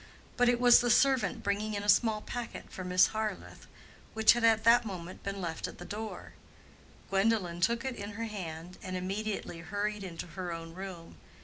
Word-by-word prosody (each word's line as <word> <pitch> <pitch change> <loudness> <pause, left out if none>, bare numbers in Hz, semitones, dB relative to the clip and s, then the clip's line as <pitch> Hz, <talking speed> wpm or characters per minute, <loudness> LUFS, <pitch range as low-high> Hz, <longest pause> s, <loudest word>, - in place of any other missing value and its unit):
But 245 0 +4
it 245 -1 +2
was 245 0 +7
the 240 - 0
servant 250 -4 +3
bringing 205 +1 -1
in 200 - -3
a - - -5
small 215 +1 +4
packet 240 +1 -6
for 185 - -6
Miss 180 0 +4
Harleth, 215 -3 -4 0.5
which 220 0 +6
had 240 0 -2
at 220 -1 +4
that 235 +2 +6
moment 185 -4 -7
been 200 0 -4
left 165 -3 -3
at - - -10
the 175 - -9
door. 215 +3 -6 0.8
Gwendolen 195 -4 +1
took 235 +5 +1
it 260 -2 -2
in 205 -1 -6
her 225 +3 -4
hand 180 -5 -7
and 185 -1 -4
immediately 195 -1 -3
hurried 205 +3 -3
into 170 -3 -6
her 180 0 -6
own 165 0 -7
room. 180 -2 -8
205 Hz, 190 wpm, -31 LUFS, 180-225 Hz, 0.8 s, was